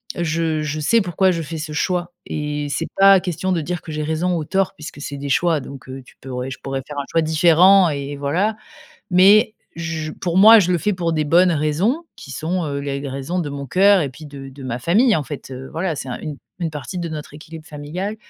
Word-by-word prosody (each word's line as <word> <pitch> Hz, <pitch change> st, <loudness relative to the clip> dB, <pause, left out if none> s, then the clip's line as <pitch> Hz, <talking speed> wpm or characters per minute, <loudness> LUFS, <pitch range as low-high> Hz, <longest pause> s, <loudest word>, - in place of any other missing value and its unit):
je 165 Hz, -2 st, -1 dB
je 150 Hz, 0 st, -3 dB
sais 225 Hz, +10 st, +3 dB
pourquoi, 190 Hz, 0 st, +2 dB
je 170 Hz, -2 st, -2 dB
fais 160 Hz, +1 st, -6 dB
ce 155 Hz, 0 st, -5 dB
choix 175 Hz, +3 st, -1 dB
et 150 Hz, -1 st, -3 dB
c'est 150 Hz, +4 st, -2 dB
pas 195 Hz, 0 st, +8 dB
question 180 Hz, +1 st, -3 dB
de 175 Hz, -3 st, +1 dB
dire, 175 Hz, +3 st, -4 dB
que 160 Hz, -, -9 dB
j'ai 155 Hz, 0 st, -3 dB
raison 160 Hz, +4 st, 0 dB
ou 155 Hz, -, -3 dB
tort, 195 Hz, +3 st, 0 dB
puisque 150 Hz, -3 st, -9 dB
c'est 145 Hz, -1 st, -5 dB
des 140 Hz, 0 st, -5 dB
choix, 160 Hz, +4 st, +2 dB
donc, 135 Hz, -1 st, -10 dB
heu, 130 Hz, 0 st, -8 dB
tu -, -, -19 dB
pourrais 130 Hz, 0 st, -5 dB
je 130 Hz, -, -7 dB
pourrais 135 Hz, -1 st, -4 dB
faire 145 Hz, -1 st, -5 dB
un 140 Hz, -, -3 dB
choix 165 Hz, -1 st, +2 dB
différent 175 Hz, +4 st, +5 dB
et 140 Hz, -1 st, -4 dB
et 145 Hz, -, -6 dB
voilà. 175 Hz, +10 st, 0 dB, 0.6 s
Mais, 195 Hz, +5 st, +6 dB, 0.3 s
je 160 Hz, -2 st, -4 dB
pour 175 Hz, -1 st, -3 dB
moi, 220 Hz, +3 st, +9 dB
je 180 Hz, -2 st, 0 dB
le 175 Hz, -, +2 dB
fais 210 Hz, +6 st, 0 dB
pour 170 Hz, -3 st, -1 dB
des 155 Hz, -1 st, 0 dB
bonnes 175 Hz, +5 st, +4 dB
raisons, 170 Hz, -, 0 dB
qui -, -, -12 dB
sont, 175 Hz, +3 st, -2 dB
heu, 140 Hz, -2 st, -3 dB
les 140 Hz, -1 st, -3 dB
les 140 Hz, -, -5 dB
raisons 140 Hz, +7 st, -3 dB
de 155 Hz, -, -3 dB
mon 140 Hz, 0 st, -6 dB
cœur 195 Hz, +7 st, +4 dB
et 145 Hz, -, -2 dB
puis 135 Hz, +4 st, -12 dB
de 140 Hz, -2 st, -9 dB
de 135 Hz, +1 st, -12 dB
ma 125 Hz, -2 st, -4 dB
famille 210 Hz, -, +3 dB
en 150 Hz, -, -2 dB
fait, 145 Hz, -1 st, -8 dB
heu, 130 Hz, 0 st, -8 dB
voilà. 165 Hz, -1 st, -2 dB
C'est 135 Hz, -, -6 dB
une 150 Hz, -2 st, -5 dB, 0.2 s
une 165 Hz, -2 st, -1 dB
partie 150 Hz, +4 st, -6 dB
de 170 Hz, -1 st, -3 dB
notre 155 Hz, -2 st, -7 dB
équilibre 155 Hz, +1 st, -11 dB
familial 165 Hz, +8 st, -5 dB
160 Hz, 245 wpm, -20 LUFS, 145-180 Hz, 0.6 s, moi